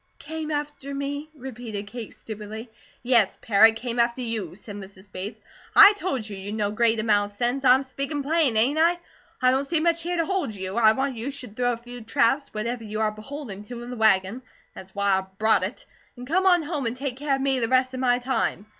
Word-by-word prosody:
"Came 315 Hz, +1 st, -6 dB
after 290 Hz, -2 st, -4 dB
me?" 285 Hz, +2 st, -4 dB
repeated 240 Hz, -6 st, -7 dB
Kate 225 Hz, +1 st, -8 dB
stupidly. 220 Hz, +2 st, -8 dB, 0.3 s
"Yes, 235 Hz, -5 st, +3 dB
parrot, 225 Hz, -1 st, +5 dB
'came 235 Hz, +1 st, -4 dB
after 235 Hz, +2 st, +1 dB
you,'" 220 Hz, -8 st, -4 dB
said 205 Hz, +1 st, -10 dB
Mrs. 195 Hz, 0 st, -12 dB
Bates. 195 Hz, +4 st, -6 dB, 0.4 s
"I 405 Hz, -, +10 dB
told 280 Hz, -, -3 dB
you, 205 Hz, -, -7 dB
you'd 200 Hz, +2 st, -6 dB
no 205 Hz, -2 st, -1 dB
great 225 Hz, +1 st, +2 dB
amount 205 Hz, -2 st, +2 dB
of 205 Hz, -, -14 dB
sense. 245 Hz, +4 st, 0 dB
I'm 260 Hz, +1 st, +5 dB
speakin' 275 Hz, +2 st, -4 dB
plain, 295 Hz, -5 st, +2 dB
ain't 265 Hz, +8 st, +2 dB
I? 340 Hz, +2 st, +4 dB, 0.5 s
I 255 Hz, -, +6 dB
don't 265 Hz, +2 st, +1 dB
see 330 Hz, +2 st, +1 dB
much 335 Hz, +1 st, +1 dB
here 350 Hz, +1 st, -2 dB
to 330 Hz, -, +1 dB
hold 375 Hz, -, -2 dB
you. 190 Hz, 0 st, -5 dB
I 220 Hz, -2 st, +5 dB
want 265 Hz, 0 st, -2 dB
you 235 Hz, +5 st, -3 dB
should 255 Hz, -6 st, -8 dB
throw 245 Hz, 0 st, +1 dB
a -, -, -5 dB
few 245 Hz, +1 st, -10 dB
traps, 275 Hz, +5 st, +1 dB
whatever 230 Hz, +2 st, -3 dB
you 215 Hz, 0 st, -5 dB
are 215 Hz, -1 st, +1 dB
beholden 215 Hz, -1 st, -8 dB
to, 240 Hz, +1 st, -8 dB
in 245 Hz, -, -8 dB
the -, -, -5 dB
wagon 220 Hz, +1 st, +2 dB, 0.3 s
that's 190 Hz, +1 st, -12 dB
why 200 Hz, -1 st, +2 dB
I 190 Hz, -, -7 dB
brought 220 Hz, +1 st, +3 dB
it -, -, -5 dB, 0.3 s
and 245 Hz, -, -8 dB
come 370 Hz, +8 st, +1 dB
on 355 Hz, -3 st, +5 dB
home 295 Hz, -5 st, -2 dB
and 235 Hz, +2 st, -3 dB
take 265 Hz, -2 st, -4 dB
care 285 Hz, 0 st, 0 dB
of 270 Hz, -, -4 dB
me 270 Hz, -1 st, +1 dB
the 230 Hz, -, 0 dB
rest 255 Hz, +1 st, +2 dB
of 255 Hz, -, -4 dB
my 245 Hz, -1 st, +3 dB
time. 250 Hz, -5 st, -1 dB
245 Hz, 225 wpm, -25 LUFS, 215-275 Hz, 0.5 s, I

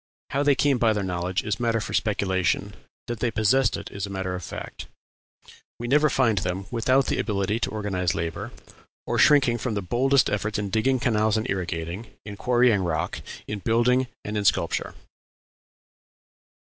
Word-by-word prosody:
How 140 Hz, -, +1 dB
they 145 Hz, -1 st, +4 dB
came 135 Hz, -1 st, +2 dB
by 115 Hz, -2 st, +3 dB
their 105 Hz, -2 st, -2 dB
knowledge 90 Hz, 0 st, -2 dB
is 110 Hz, +1 st, -2 dB
matter 115 Hz, -1 st, +1 dB
for 105 Hz, -, -5 dB
speculation; 95 Hz, -4 st, 0 dB, 0.3 s
that 120 Hz, -2 st, -5 dB
they 120 Hz, -, +1 dB
possessed 115 Hz, +5 st, +2 dB
it -, -, -8 dB
is 100 Hz, 0 st, -5 dB
matter 95 Hz, -1 st, -3 dB
of 90 Hz, -1 st, -5 dB
fact. -, -, -7 dB, 0.9 s
We 120 Hz, -, -5 dB
never 150 Hz, +4 st, +4 dB
find 115 Hz, -7 st, +2 dB
them 95 Hz, +1 st, -3 dB
without 130 Hz, +3 st, +2 dB
the -, -, -1 dB
ability 105 Hz, 0 st, -1 dB
to 120 Hz, -, -1 dB
organize 95 Hz, -5 st, -1 dB
labor, 80 Hz, 0 st, -4 dB, 0.5 s
or -, -, -1 dB
shrinking 135 Hz, -5 st, +5 dB
from 110 Hz, -1 st, -2 dB
the 100 Hz, -, -1 dB
very 90 Hz, -, -14 dB
boldest 135 Hz, +2 st, +3 dB
efforts 105 Hz, +1 st, -1 dB
in 100 Hz, -1 st, -3 dB
digging 125 Hz, +5 st, +2 dB
canals 110 Hz, -3 st, +2 dB
and 110 Hz, -, -2 dB
irrigating, 90 Hz, +2 st, -4 dB, 0.2 s
in 105 Hz, -2 st, -7 dB
quarrying 120 Hz, -2 st, +3 dB
rock, 85 Hz, -3 st, -2 dB, 0.2 s
in 105 Hz, -, -4 dB
building, 120 Hz, +4 st, +2 dB, 0.2 s
and 105 Hz, -, -4 dB
in 105 Hz, -, 0 dB
sculpture." -, -, 0 dB
110 Hz, 175 wpm, -25 LUFS, 95-120 Hz, 0.9 s, shrinking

